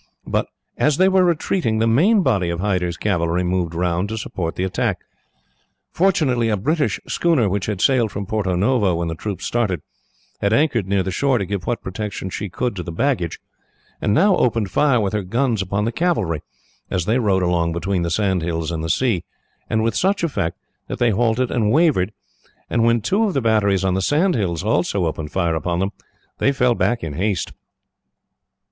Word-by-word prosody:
But, - - -1 0.3
as 150 -1 +3
they 185 - +5
were 190 -1 +4
retiring, 170 - +1
the 110 - +2
main 180 - +4
body 100 - +1
of 85 0 -3
Hyder's 90 -3 -1
cavalry 85 -3 0
moved 90 -2 -1
round 90 +3 0
to 110 - -4
support 85 -6 -4
the 90 - -2
attack. 95 - -1 0.9
Fortunately 140 -11 +2
a 105 - +1
British 145 - 0
schooner, 160 -10 +2
which 100 0 -1
had 105 -3 -2
sailed 125 -5 +3
from 100 0 -4
Porto 95 -3 -1
Novo 100 -1 +2
when 85 0 -2
the - - -2
troops 100 +4 -5
started, 105 -9 -1 0.6
had 100 +1 +1
anchored 120 - +2
near 100 -1 +1
the 95 - -3
shore 135 +5 +1
to 100 - -1
give 100 -1 -4
what 120 - -2
protection 95 -1 -5
she 105 +2 -4
could 120 +5 -2
to 90 - -4
the 85 - -6
baggage, 90 - -1 0.6
and - - +1
now 190 - +4
opened 115 -5 +1
fire 140 -5 +3
with 100 -2 -1
her 105 - 0
guns 115 +3 0
upon 100 +2 -1
the 115 - 0
cavalry, 115 - 0 0.5
as 90 -3 -1
they 115 +5 +2
rode 100 -5 +2
along 85 -1 +1
between 90 +3 -1
the 85 - -1
sand 95 0 +1
hills 80 -1 -2
and 80 -1 -3
the 80 - -3
sea; 110 -4 +1 0.5
and 110 0 +1
with 115 -1 0
such 195 - +1
effect 110 - -1 0.3
that - - -4
they 120 -2 +2
halted 120 +3 +1
and 110 -3 +1
wavered; 145 - +3 0.6
and 115 - +2
when 115 0 +3
two 200 - +1
of 200 - -2
the - - +3
batteries 100 -4 +2
on 95 - +2
the 95 - 0
sand 160 - +2
hills 90 -6 -1
also 100 -3 +1
opened 80 -1 -4
fire 85 -3 0
upon 85 +2 -1
them, 95 +2 -1 0.5
they 135 - +3
fell 125 -3 +2
back 120 0 0
in 80 - -4
haste. 95 +1 -1
105 Hz, 200 wpm, -21 LUFS, 90-125 Hz, 0.9 s, they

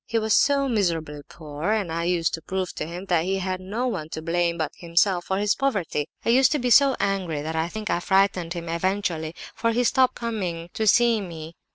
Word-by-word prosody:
He 230 - -1
was 220 -1 +1
so 280 -1 +3
miserably 165 - -1
poor, 155 +5 -3
and 205 -6 -1
I 170 +1 -2
used 170 -2 +1
to 165 - -3
prove 185 +1 -3
to 150 - -5
him 175 +3 -7
that 175 -4 +1
he 190 +2 -1
had 185 -1 -3
no 210 +7 -3
one 175 -11 -3
to 160 - -6
blame 170 0 0
but 155 -2 -2
himself 175 +1 +1
for 190 - -1
his 205 +1 +2
poverty. 195 - -1 0.2
I - - +1
used 255 +2 +5
to - - +1
be 250 -3 -1
so 275 +3 +6
angry 180 -7 -1
that 160 +1 -4
I 160 +1 0
think 215 +2 -4
I - - +1
frightened 190 -2 +1
him 170 -1 -6
eventually, 170 -2 -2 0.2
for 230 - 0
he 245 +2 +1
stopped 255 +1 +3
coming 180 -8 -4
to 220 - -1
see 235 0 +4
me. 165 -3 -8
185 Hz, 225 wpm, -24 LUFS, 165-220 Hz, 0.2 s, so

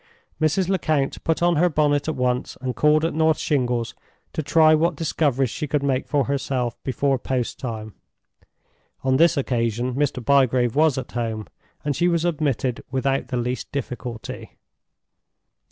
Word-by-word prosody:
Mrs. 155 +4 +2
Lecount 155 -7 0
put 165 +1 0
on 175 -2 +3
her 175 +3 +4
bonnet 145 -2 +1
at 155 - -1
once, 125 -1 -1
and 130 -1 -3
called 150 +1 +3
at 165 - -1
North 160 0 +3
Shingles 125 -5 0 0.4
to - - -1
try 155 +2 +5
what 165 +2 +2
discoveries 140 -5 0
she 150 - -4
could 145 0 0
make 135 -2 0
for 145 -2 +2
herself 130 -3 -2
before 135 0 0
post 125 -1 -2
time. 110 -4 -5 1.1
On 130 0 +2
this 170 +1 +4
occasion 120 -2 -1
Mr. 140 +1 0
Bygrave 130 -3 +3
was 155 -2 +3
at 130 - -5
home, 115 -3 -3 0.4
and 145 -2 0
she 175 +5 +2
was 170 -1 +1
admitted 140 -7 -1
without 135 +1 0
the 125 - -2
least 125 +1 -3
difficulty. 125 -4 -6
140 Hz, 155 wpm, -23 LUFS, 125-155 Hz, 1.1 s, try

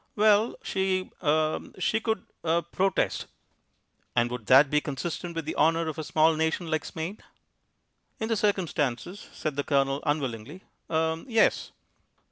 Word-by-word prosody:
"Well, 215 +1 +4
she 190 -1 -1
er 155 -1 +2 0.2
she 200 +4 +1
could 220 -4 -2 0.2
er 170 +1 +1
protest." 185 +3 0 0.9
"And 120 0 +2
would 125 -4 -6
that 135 +2 +7
be 150 0 +3
consistent 170 +4 -4
with 165 -2 -3
the 155 - -4
honour 165 +1 +3
of 160 0 -4
a - - -2
small 160 +1 +3
nation 160 +1 -1
like 155 - 0
Spain?" 170 +6 -5 1.0
"In 220 - -2
the 225 - +1
circumstances," 180 - -1
said 150 -2 -4
the 145 - 0
Colonel 140 0 +1
unwillingly, 145 - -3 0.3
"er 160 0 0
yes." 225 -3 +2
160 Hz, 145 wpm, -27 LUFS, 150-185 Hz, 1.0 s, that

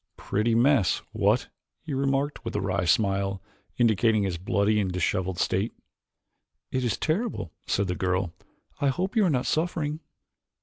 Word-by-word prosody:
"Pretty 110 +3 0
mess, 120 -5 +3
what?" - - +1 0.3
he 155 -3 -5
remarked 135 +2 0
with - - -5
a - - +1
wry 95 -1 -1
smile, 100 0 +1 0.4
indicating 110 -2 +3
his 90 -4 -2
bloody 100 +3 +2
and 95 -3 0
disheveled 90 0 -1
state. 95 +5 0 1.0
"It 130 - 0
is 120 -5 0
terrible," 170 - -1 0.2
said 100 - +1
the 90 - -1
girl. 90 -1 -1 0.5
"I 140 - +2
hope 185 - -1
you 220 - +4
are - - +3
not 130 -5 +1
suffering." 155 -2 -1
110 Hz, 150 wpm, -27 LUFS, 95-140 Hz, 1.0 s, you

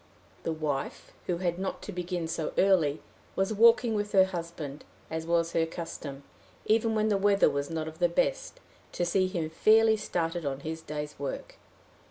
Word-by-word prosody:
The - - 0
wife, 150 -4 -3 0.2
who 175 - 0
had 175 -1 -1
not 190 - -4
to - - -6
begin 175 -2 -3
so 160 -1 -3
early, 170 -7 +3 0.3
was 195 +3 0
walking 230 +2 +5
with 205 -1 -2
her 190 -1 +7
husband, 170 -5 -6 0.3
as 160 0 -3
was 170 0 +2
her 165 -1 +1
custom, 155 -4 -7 0.4
even 225 +1 +2
when 215 0 +2
the 200 -2 +2
weather 200 0 +4
was 140 0 -2
not 160 -1 -3
of 160 +1 -9
the 175 -1 +3
best, - - -1 0.3
to 175 - 0
see 185 +2 +2
him 170 -4 -3
fairly 220 +5 +5
started 170 -4 -2
on 140 -1 -3
his 160 +1 -5
day's 150 -1 -6
work. 140 - -5
170 Hz, 180 wpm, -29 LUFS, 160-195 Hz, 0.4 s, her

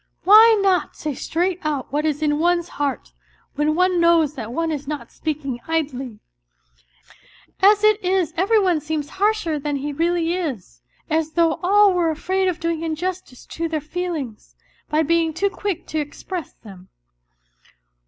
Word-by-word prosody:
Why 435 +3 +7
not 375 -2 +1
say 300 -1 -4
straight 350 +6 -2
out 295 -5 -3
what 300 +2 +1
is 300 0 -2
in 295 -1 +1
one's 345 +1 +1
heart, 285 -2 -3 0.4
when 300 +2 0
one 365 0 +2
knows 335 -3 +4
that 230 -6 -7
one 330 +5 -1
is 290 -2 -5
not 300 -1 -5
speaking 285 -5 -4
idly? 270 -8 -2 1.4
As 410 +2 +5
it 430 -1 +3
is 365 -3 0
every 395 +6 +2
one 360 -6 +1
seems 305 -1 -3
harsher 410 -8 +1
than 290 0 -2
he 285 +1 -3
really 335 +2 0
is, 250 - -5 0.3
as 315 0 -1
though 335 -2 +2
all 400 +2 +5
were 345 -2 +1
afraid 375 +5 -1
of 360 -3 -1
doing 335 -1 -2
injustice 330 -4 -4
to 330 0 -4
their 315 -1 -1
feelings, 305 -7 -5 0.3
by 305 +1 +2
being 325 0 +1
too 400 +3 0
quick 390 -4 -4
to 315 - -1
express 310 +4 -6
them." 190 -4 -15
325 Hz, 160 wpm, -21 LUFS, 295-360 Hz, 1.4 s, Why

